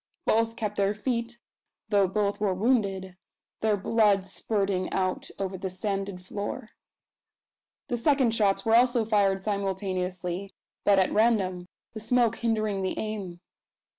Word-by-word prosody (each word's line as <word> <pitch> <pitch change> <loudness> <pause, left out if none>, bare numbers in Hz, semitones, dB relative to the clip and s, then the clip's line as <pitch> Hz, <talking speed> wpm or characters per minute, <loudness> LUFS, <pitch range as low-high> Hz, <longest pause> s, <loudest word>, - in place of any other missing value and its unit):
Both 225 +1 +2
kept 210 -2 -3
their 200 +1 +1
feet, 235 +1 -2 0.5
though 200 -2 +4
both 205 +1 -1
were 200 -3 +1
wounded 195 -4 0 0.4
their 215 -2 +2
blood 205 -1 +2
spurting 195 -1 -1
out 185 -1 -1
over 190 -1 -3
the 190 - -3
sanded 195 0 -3
floor. 205 +3 -5 1.2
The 245 - -1
second 260 -2 +3
shots 205 -1 +2
were 225 - +2
also 245 -1 +4
fired 200 -3 +2
simultaneously, 190 -2 -3 0.3
but 200 -1 +5
at 190 - +2
random, 195 -5 +2 0.3
the 220 - -6
smoke 235 +1 +2
hindering 215 -4 0
the 190 - -2
aim. 200 -5 -5
200 Hz, 135 wpm, -27 LUFS, 190-225 Hz, 1.2 s, but